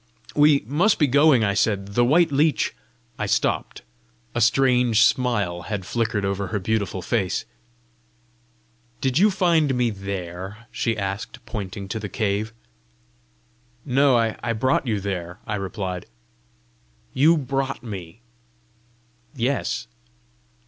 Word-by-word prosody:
"We 145 -1 +5
must 170 - +2
be 150 - +4
going!" 140 -2 +4
I 100 -2 +1
said. 100 -1 0
"The 120 +4 +2
white 160 +6 +4
leech 145 -4 +2 0.2
" - - -35
I - - -1
stopped: - - -1 0.5
a - - -1
strange 125 -1 +4
smile 105 -11 +1
had 100 -4 -3
flickered 115 -3 -1
over 100 0 -2
her 105 - -2
beautiful 100 -2 -2
face. 100 -2 -1 1.5
"Did 130 +2 +1
you 210 +3 +6
find 170 -8 +2
me 120 -2 +1
there?" 95 +1 -6
she 115 -2 -1
asked, 100 0 -5
pointing 100 -2 -6
to 110 - -3
the 105 -1 -5
cave. 105 +2 -1 1.3
"No; 135 -1 +4
I 115 0 -1
brought 130 +4 +1
you 110 -3 0
there," 90 -2 -4
I 110 - -3
replied. 95 -2 -4 1.1
"You 155 +6 +5
brought 135 -1 -2
me?" 100 -2 -8 1.1
"Yes." 125 0 -1
115 Hz, 125 wpm, -23 LUFS, 100-135 Hz, 1.5 s, you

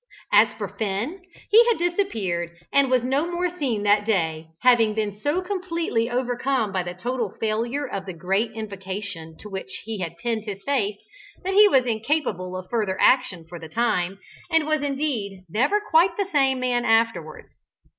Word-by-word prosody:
As - - +6
for - - -4
Finn, 225 - -3 0.3
he 450 +3 +9
had 470 - +3
disappeared 225 - -1 0.2
and 280 -1 +4
was 255 -2 +3
no 275 +6 0
more 355 0 -1
seen 235 -8 0
that 205 0 +4
day, 165 -7 0 0.2
having 230 -4 +5
been 210 -2 -1
so 290 - -1
completely 340 - -1
overcome 245 -2 0
by 190 -2 0
the 175 0 -6
total 235 +1 -3
failure 235 +6 -1
of 195 -6 -5
the 185 - -4
great 195 +6 0
invocation 195 -6 -6
to - - -9
which 190 -10 -6
he 220 -1 -5
had 170 -2 -4
pinned 220 +3 -2
his 200 -2 -6
faith, 215 -8 0 0.5
that 385 +1 -1
he 415 +1 +8
was 265 -10 +4
incapable 220 - -1
of 185 0 -8
further 210 -5 0
action 195 -10 +3
for 170 0 -9
the 160 -1 -9
time, 195 -3 0 0.3
and 325 -2 +3
was 310 -1 +1
indeed 270 -10 -2
never 260 - +2
quite 345 -3 +3
the 400 - +1
same 270 -4 +3
man 250 -1 0
afterwards. 225 -9 +1
225 Hz, 175 wpm, -24 LUFS, 195-280 Hz, 0.5 s, he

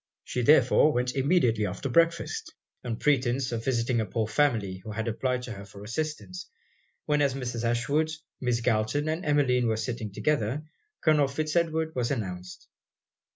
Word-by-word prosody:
She 125 - -2
therefore 135 +3 +5
went 125 +1 0
immediately 130 - +2
after 95 +9 -4
breakfast, 170 - +1 0.3
on 120 -2 -2
pretence 130 -2 +1
of 115 -1 -3
visiting 120 -2 +1
a - - -1
poor 110 +2 -1
family 110 -8 +1
who 110 - -6
had 110 +2 -3
applied 125 +2 -1
to 125 - -6
her 100 -2 -7
for 100 0 -12
assistance; 155 - -4 0.6
when 150 -1 +2
as 140 -2 +2
Mrs. 120 -3 -4
Ashwood, 120 +7 +1 0.3
Miss 125 -2 0
Galton 110 +7 +1
and 160 +3 -1
Emmeline, 130 -5 +2
were 110 -1 +1
sitting 110 -1 -4
together, 140 +3 0 0.4
Colonel 150 -3 +4
Fitz 155 +3 -3
Edward 160 -1 +1
was 120 -2 -1
announced. 90 -8 -5
125 Hz, 160 wpm, -28 LUFS, 115-150 Hz, 0.6 s, therefore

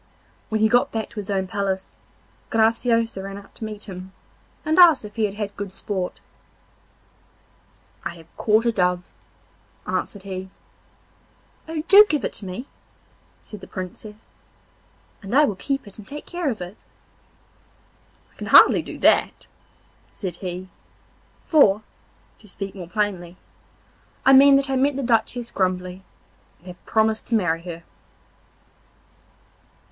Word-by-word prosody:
When 220 -1 -1
he 220 - +5
got 245 +2 +3
back 220 -1 -3
to - - -17
his 205 -1 -5
own 190 -1 0
palace 190 0 -3 0.5
Graciosa 230 -1 +2
ran 195 0 -7
out 200 - -14
to - - -9
meet 215 -1 -6
him, 185 0 -9 0.5
and 315 +3 +2
asked 330 -10 +7
if 210 - -11
he 220 -2 +1
had 200 -1 -4
had 205 -1 -4
good 200 -2 -6
sport. 190 -1 -4 1.8
'I 170 - -5
have 165 -1 -17
caught 220 +1 +2
a 235 - +3
dove,' 180 -3 +1 0.8
answered 200 -2 -3
he. 190 -1 -6 1.2
'Oh! 320 -1 -4
do 410 +1 +10
give 300 -4 0
it - - -3
to 200 - -6
me,' 185 +8 -6 0.8
said 210 -3 -10
the 190 - -11
Princess, 210 +3 -8 0.9
'and 200 +4 -4
I 295 +2 +6
will 210 - -2
keep 275 +4 -3
it 205 - -8
and 205 - -12
take 290 +2 -8
care 345 -4 -2
of 220 -7 -4
it.' 180 +4 -9 1.5
'I - - -30
can - - -6
hardly - - +7
do - - -9
that,' - - +2 0.6
said 180 -4 -6
he, 185 0 -6 0.8
'for, 215 - +4 0.6
to 215 - -18
speak 195 +1 -6
more 180 -4 -8
plainly, 185 -4 -2 0.9
I 270 - +7
mean 275 +1 +8
that 275 0 +2
I 265 - +1
met 275 +2 +2
the 275 - -3
Duchess 235 0 0
Grumbly, 185 0 -2 0.6
and 175 - -28
have 180 -1 -12
promised 220 0 +1
to 235 - +1
marry 170 -6 +1
her. 170 -1 -8
210 Hz, 150 wpm, -23 LUFS, 185-235 Hz, 1.8 s, do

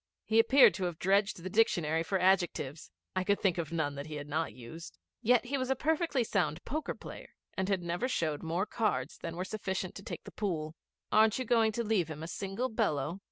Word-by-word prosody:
He 220 0 +3
appeared 265 +1 +7
to 190 +1 -2
have 175 -2 -3
dredged 195 +3 +2
the 185 - -4
dictionary 170 -7 +2
for 180 +4 0
adjectives. 175 -6 +1 0.3
I 185 - +1
could 200 +1 +2
think 185 -3 +1
of 165 -2 -3
none 160 -4 -1
that 140 +1 -6
he 155 - -6
had 145 0 -6
not 155 +2 -1
used. 130 +8 -10 0.2
Yet 245 +1 +4
he 275 +2 -1
was 255 0 -2
a 265 - +3
perfectly 315 -2 +1
sound 175 -7 -1
poker 305 +5 -3
player - - -10 0.2
and 190 +1 -1
never 175 +8 -1
showed 160 - -1
more 170 +4 -1
cards 205 - -1
than 165 0 -5
were 180 +2 -3
sufficient 190 -2 -3
to 195 - -10
take - - -6
the - - -10
pool. 160 -7 -2 0.4
'Aren't 215 0 +5
you 255 - -2
going 225 -1 +3
to 235 - -1
leave 210 -7 +1
him 155 0 -7
a - - -5
single 195 +7 -3
bellow?' 175 - -1
185 Hz, 215 wpm, -31 LUFS, 160-220 Hz, 0.4 s, appeared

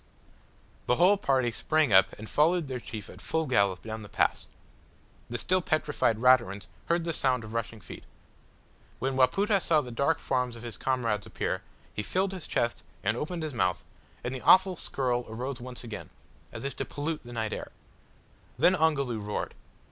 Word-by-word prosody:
The 125 - +4
whole 180 +6 +6
party 130 -10 +1
sprang 155 0 +2
up 95 - +7
and 110 - -8
followed 165 +4 +2
their 130 -2 -3
chief 110 -4 -7
at - - -11
full 160 0 0
gallop 100 -8 +2
down 110 0 -5
the 105 - -10
pass. - - 0 0.8
The 120 - -2
still 185 +8 +2
petrified 150 -8 +1
Raturans 120 -5 +3 0.2
heard 170 0 +2
the 165 0 -2
sound 130 -5 +1
of 110 0 -9
rushing 115 -1 -3
feet. 95 - -11 0.9
When 135 0 -1
Wapoota 195 - +3
saw 160 -3 +4
the 125 - -8
dark 140 +4 +1
forms 125 -2 -1
of 115 - -10
his 120 -2 -5
comrades 115 -6 -1
appear, - - -2 0.3
he - - -2
filled 190 - 0
his 185 -4 -6
chest 120 0 0 0.2
and 105 +3 +1
opened 165 +5 -3
his 155 -3 -4
mouth, 90 -7 0 0.4
and 125 - -3
the 130 - -5
awful 185 0 +6
skirl 125 -6 -1
arose 125 +3 -4
once 125 0 -7
again, 115 -3 -7 0.4
as - - -7
if 140 - -3
to - - -2
pollute 150 +2 -3
the 120 - -11
night 110 -2 -2
air. - - -6 0.9
Then 180 - +5
Ongoloo 140 -9 +1
roared. 105 0 -3
130 Hz, 180 wpm, -29 LUFS, 115-155 Hz, 0.9 s, up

